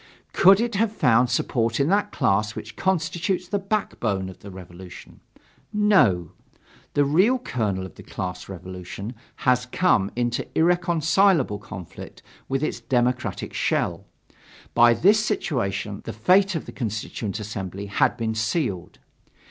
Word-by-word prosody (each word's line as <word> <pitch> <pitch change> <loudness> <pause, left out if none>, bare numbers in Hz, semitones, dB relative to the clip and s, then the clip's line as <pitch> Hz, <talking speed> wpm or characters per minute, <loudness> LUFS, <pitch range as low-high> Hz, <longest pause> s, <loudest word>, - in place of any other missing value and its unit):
Could 195 +1 +6
it 235 0 -1
have 210 +2 +1
found 125 - +3
support 115 -1 0
in 140 - +2
that 205 +2 +1
class 105 -4 +1
which 110 0 -8
constitutes 180 0 -1
the 200 +2 -1
backbone 115 - -2
of 95 - -12
the 100 - -11
Revolution? 90 -1 -12 0.5
No. 150 - +3 0.6
The 145 - +4
real 185 - +3
kernel 105 - -2
of 95 - -11
the - - -13
class 90 0 -6
revolution 95 +3 -7 0.3
has 125 -1 +3
come 125 - +2
into 120 0 -1
irreconcilable 170 - +2
conflict 90 -4 -10 0.3
with 135 +2 -1
its - - -2
democratic 125 0 -1
shell. - - -1 0.7
By 120 0 +6
this 210 - +4
situation 105 - -2
the - - -5
fate 185 - +3
of 160 - -3
the - - -8
Constituent 110 -3 -4
Assembly 100 -2 -5
had 100 - +1
been 115 -1 -1
sealed. 110 - -2
120 Hz, 135 wpm, -24 LUFS, -, 0.7 s, Could